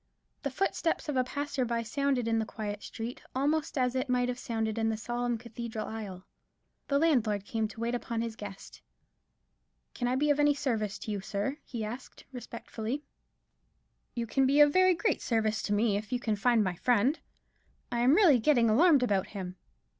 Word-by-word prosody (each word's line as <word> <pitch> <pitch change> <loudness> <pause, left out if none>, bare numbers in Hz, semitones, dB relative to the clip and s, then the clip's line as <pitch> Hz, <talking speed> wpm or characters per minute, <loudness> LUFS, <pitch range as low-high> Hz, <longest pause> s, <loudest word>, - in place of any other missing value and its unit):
The 280 - -2
footstep 330 +2 -1
of 295 - -1
a 255 - +3
passer 285 +1 -2
by 235 -1 -1
sounded 265 +1 0
in 225 0 +2
the 220 - -1
quiet 210 -1 -5
street 230 +2 -6
almost 295 +3 0
as 250 -1 +2
it 260 +1 -2
might 250 0 +2
have 250 0 -3
sounded 225 -2 -2
in 225 0 +1
the 220 - -1
solemn 240 +1 -2
cathedral 230 -1 -6
aisle. 200 -5 -7 0.6
The 280 - +2
landlord 235 -10 +2
came 220 0 -1
to 225 - -12
wait 235 +1 -1
upon 235 -1 -2
his 230 -1 -4
guest. 205 -3 -9 1.1
"Can 245 - -2
I 250 - +1
be 295 +3 +2
of 290 - +1
any 290 0 +4
service 225 -8 -1
to 215 - -6
you, 200 -2 -2
sir?" 205 +8 -2
he 230 -4 -5
asked, 240 +4 -8
respectfully. 240 +1 -5 1.1
"You 235 -1 -1
can 265 +3 +2
be 280 +2 +3
of 295 -1 +7
very 370 -1 +5
great 435 +6 0
service 220 -2 0
to 205 - -1
me, 205 -1 +2
if 210 0 -6
you 250 - 0
can 220 -3 0
find 230 +1 +3
my 185 -3 -2
friend; 245 - +2 0.7
I 240 - -1
am 255 +5 +5
really 340 - +6
getting 235 -3 +4
alarmed 290 +2 +5
about 200 -6 +1
him." 185 -1 -5
240 Hz, 190 wpm, -30 LUFS, 220-270 Hz, 1.1 s, of